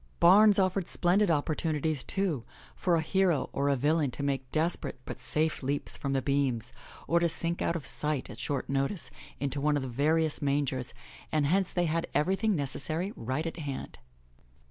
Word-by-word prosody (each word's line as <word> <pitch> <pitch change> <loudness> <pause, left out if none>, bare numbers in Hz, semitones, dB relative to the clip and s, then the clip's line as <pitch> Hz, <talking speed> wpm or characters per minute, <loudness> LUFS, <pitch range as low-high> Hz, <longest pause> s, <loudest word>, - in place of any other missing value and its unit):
Barns 205 +4 +7
offered 185 -2 +1
splendid 185 +3 +2
opportunities, 155 -1 0
too, 180 - -1 0.3
for 175 -2 +1
a 165 - +2
hero 175 -3 +1
or 140 +1 +1
a 140 - +3
villain 145 +2 +2
to 140 - -3
make 135 -2 -2
desperate 165 -2 -1
but - - -7
safe 155 +5 -1
leaps 140 +2 -2
from 140 -1 -3
the 135 -1 0
beams, 135 -5 0 0.3
or 170 - +3
to 170 0 +2
sink 170 +1 -2
out 170 - +1
of 155 -6 -4
sight, 150 +1 0
at - - -10
short 140 -3 -2
notice, 140 +7 -1 0.3
into 140 0 -2
one 150 +1 +2
of 140 - -2
the - - -3
various 155 +5 +1
man 145 0 +2
gers, 130 -2 -3 0.4
and 155 -2 +2
hence 185 +5 +2
they 175 -1 +1
had 165 +1 -1
everything 195 +6 +2
necessary 155 - -2
right 130 +7 -3
at 165 - -4
hand. 140 - -6
155 Hz, 185 wpm, -29 LUFS, 140-170 Hz, 0.4 s, Barns